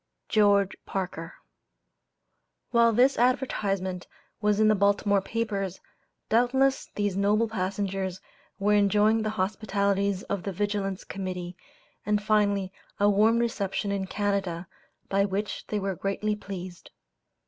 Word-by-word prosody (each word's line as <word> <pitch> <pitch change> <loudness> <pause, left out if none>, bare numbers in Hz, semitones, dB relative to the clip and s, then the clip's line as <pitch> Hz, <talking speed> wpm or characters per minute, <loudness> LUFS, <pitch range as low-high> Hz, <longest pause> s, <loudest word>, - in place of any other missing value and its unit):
GEORGE 200 -2 +3
PARKER." 175 -4 -4 1.4
While 235 -1 +5
this 250 +5 +3
advertisement 195 -7 0 0.3
was 210 0 +2
in 215 - +5
the 215 - +5
Baltimore 200 0 +2
papers, 200 -4 -3 0.5
doubtless 265 +4 +2
these 205 -2 0
noble 210 +3 +2
passengers 190 -2 -2 0.4
were 205 +1 +2
enjoying 210 +2 +4
the 215 - -1
hospitalities 200 0 0
of 200 -2 -3
the 195 - -4
Vigilance 200 0 -2
Committee, 180 -2 -5 0.5
and 210 0 +1
finally 205 -2 +1 0.3
a 205 0 +4
warm 215 +3 +4
reception 205 -4 -1
in 195 -1 -2
Canada, 195 -4 -2 0.4
by 195 0 +2
which 200 +1 -3
they 210 - -2
were 195 -1 -2
greatly 200 +3 -2
pleased. 185 -3 -8
200 Hz, 120 wpm, -27 LUFS, 195-215 Hz, 1.4 s, While